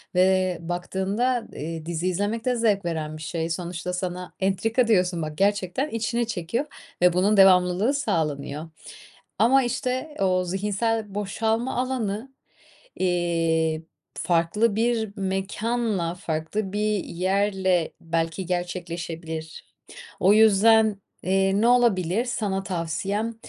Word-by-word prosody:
Ve 185 0 +3
baktığında, 190 +8 -1
ııı, 160 +1 -5
dizi 170 +1 -2
izlemek 205 +5 -1
de 250 -1 +2
zevk 210 -5 +1
veren 155 -2 -3
bir - - -11
şey; 165 +1 -3
sonuçta 175 +1 -4
sana, 180 0 -4
"Entrika." 220 +6 +1
diyorsun, 180 -5 +2
bak, 155 -1 -5
gerçekten 205 +7 +1
içine 235 0 -1
çekiyor 220 - -2 0.4
ve 180 -1 +5
bunun 200 +4 +3
devamlılığı 185 +5 +5
sağlanıyor. 155 - -2 0.7
Ama, 265 +4 +5
işte, 255 +4 -2
o 185 -1 +2
zihinsel 205 +3 -1
boşalma 220 +4 -1
alanı, 250 -1 -2 0.7
iii, 165 -3 +1 0.3
farklı 185 +6 +1
bir 225 -2 0
mekânla, 195 0 -1
farklı 175 +4 -3
bir 210 -1 0
yerle 190 -1 0
belki 165 +2 -2
gerçekleşebilir. 170 -2 -4 0.6
O 190 - +5
yüzden, 220 +1 +6 0.4
ııı, 195 +1 +2
ne 235 - +4
olabilir 225 -4 +3
sana 200 -6 -2
tavsiyem? 195 +5 -2
190 Hz, 110 wpm, -25 LUFS, 175-220 Hz, 0.7 s, yüzden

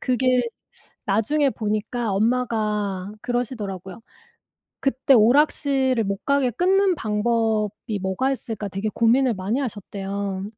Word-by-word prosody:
그게 255 0 +2 0.7
나중에 270 +8 +2
보니까 215 +1 -2
엄마가 210 -4 0
그러시더라고요. 220 -6 -4 0.8
그때 270 +1 +2
오락실을 260 +1 +3
못 195 0 -4
가게 280 -3 +2
끊는 375 - +3
방법이 215 -2 -1
뭐가 190 +8 0
있을까 225 -6 -4
되게 195 +3 -3
고민을 240 +2 +3
많이 200 +8 -1
하셨대요. 200 -4 -4
225 Hz, 270 characters per minute, -23 LUFS, 205-255 Hz, 0.8 s, 오락실을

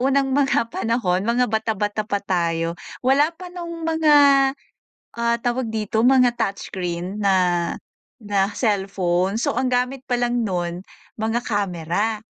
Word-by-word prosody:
unang 270 +1 +2
mga 270 -4 +1
panahon, 220 -4 0
mga 245 +2 +3
bata-bata 215 -2 -2
pa 200 -2 -2
tayo, 170 -2 0 0.3
wala 280 +4 +4
pa 360 0 -10
nung 335 -2 -6
mga, 320 -2 +3 1.0
ah, 235 0 +1
tawag 240 -1 -2
dito, 220 +1 -1
mga 250 -2 +4
touch 200 -4 -2
screen 180 +1 -4
na 195 -1 +4 0.8
na 205 -3 0
cellphone. 195 -3 0
So, 275 +4 0
ang 260 - 0
gamit 250 +1 -1
palang 245 0 +1
nun, 175 -3 -2 0.4
mga 225 +2 0
camera, 200 +1 -1
225 Hz, 130 wpm, -22 LUFS, 195-250 Hz, 1.0 s, wala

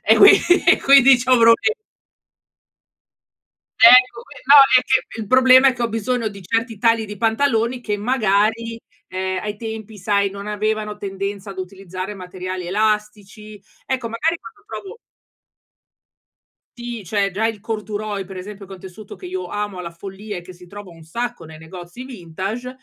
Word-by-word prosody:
e - - +6
quin - - +8 0.4
e - - +5
quindi 275 -1 +6
c'ho 255 +1 +2
proble 230 - +4 2.1
Ecco 250 0 +7
qui, - - -16
no 280 +2 +6 0.2
é 255 - +4
che 260 -3 -1
il 215 - -6
problema 260 +1 +6
è 260 - +2
che 240 - -6
ho 235 - 0
bisogno 225 +1 -2
di 200 -2 -6
certi 225 +3 -2
tagli 230 0 +2
di 210 0 -8
pantaloni 230 +2 0
che 210 -3 -3
magari 225 0 0 0.3
ehm, 185 0 -4
ai 210 0 -5
tempi 220 -1 -8
sai 200 0 0
non 200 +1 -8
avevano 210 0 -3
tendenza 200 0 -6
ad 190 - -11
utilizzare 185 +1 -7
materiali 185 -1 -7
elastici. 210 +1 -3 0.3
Ecco, 255 -3 -3
magari 305 +9 -1
quando 415 +2 -15
provo 430 +1 -9 1.8
Sì, 240 -4 -7
cioè 200 +2 -1
già 215 +4 0
il 225 -2 -4
corduroy 210 -2 -5
per 190 0 -11
esempio, 200 +2 -9
che 195 - -18
è - - -7
un - - -19
tessuto 195 +3 -11
che 365 - -11
io 370 +1 -5
amo 205 -2 -5
alla 175 -1 -6
follia 195 +4 -9
e 175 - -7
che 180 - -12
si 180 0 -16
trova 205 0 -11
un 165 -1 -16
sacco 235 +4 -5
nei 160 -1 -12
negozi 175 +8 -11
vintage, 200 +1 -6
210 Hz, 170 wpm, -20 LUFS, 195-235 Hz, 2.1 s, quin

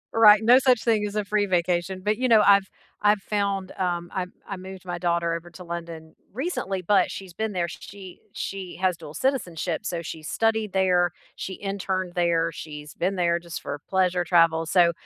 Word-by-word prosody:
Right, 215 -1 +7
no 245 +3 +7
such 250 -3 +3
thing 215 -3 +2
as 205 - -7
a 210 - 0
free 205 0 +1
vacation, 180 +1 0
but, 210 +1 +1
you 255 - +1
know, 220 -2 +7
I've 200 -1 +6 0.3
I've 210 0 +4
found, 200 -2 -1
um, 175 -2 -1
I 185 -1 -2 0.2
I 195 - -5
moved 190 0 -10
my 175 -1 -4
daughter 170 -1 0
over 170 +1 -6
to 180 +1 -11
London 170 -2 -7 0.2
recently, 215 - -2
but 205 -2 +4
she's 190 -3 -8
been 220 +4 -2
there, 175 -2 -1
she 190 +2 -10
she 190 -2 -5
has 185 -1 +1
dual 150 -1 -11
citizenship, 180 - -1
so 170 -1 -3
she 160 0 -7
studied 220 +5 0
there, 180 -2 +3 0.3
she 190 - -5
interned 190 -2 -3
there, 170 -1 +1
she's 150 -2 -9
been 190 +3 -1
there 170 -1 +1
just 170 -1 -7
for 145 - -5
pleasure 185 -2 +2
travel, 165 -2 +3
so 175 -1 +4
185 Hz, 190 wpm, -25 LUFS, 170-205 Hz, 0.3 s, Right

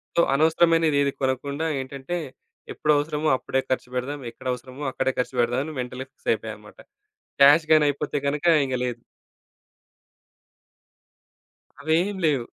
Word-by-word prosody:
So 170 - +5
అనవసరమైనది 160 0 +3
ఏది 140 -1 +1
కొనకుండా, 140 +3 -1 0.2
ఏంటంటే, 135 +6 -5 0.6
ఎప్పుడవసరమో 150 +1 +1
అప్పుడే 135 +1 -1
ఖర్చుపెడదాం, 130 +3 -3
ఎక్కడవసరమో 130 +3 -6
అక్కడే 130 - -1
ఖర్చుపెడదాం 125 0 0
అని 155 -1 -7
మెంటల్‌‌గా 130 +2 -7
ఫిక్స్ - - -7
అయిపోయమనమాట. - - -8 0.6
క్యాష్ 150 +3 +7
గాని, 155 -1 +5
అయిపోతే 145 +1 -2
గనక 150 +3 -2 0.2
ఇంగ 130 -1 -2
లేదు. 120 -1 -4 2.8
అవేమి 165 +7 +1
లేవు. 140 -6 +1
140 Hz, 110 wpm, -24 LUFS, 130-155 Hz, 2.8 s, క్యాష్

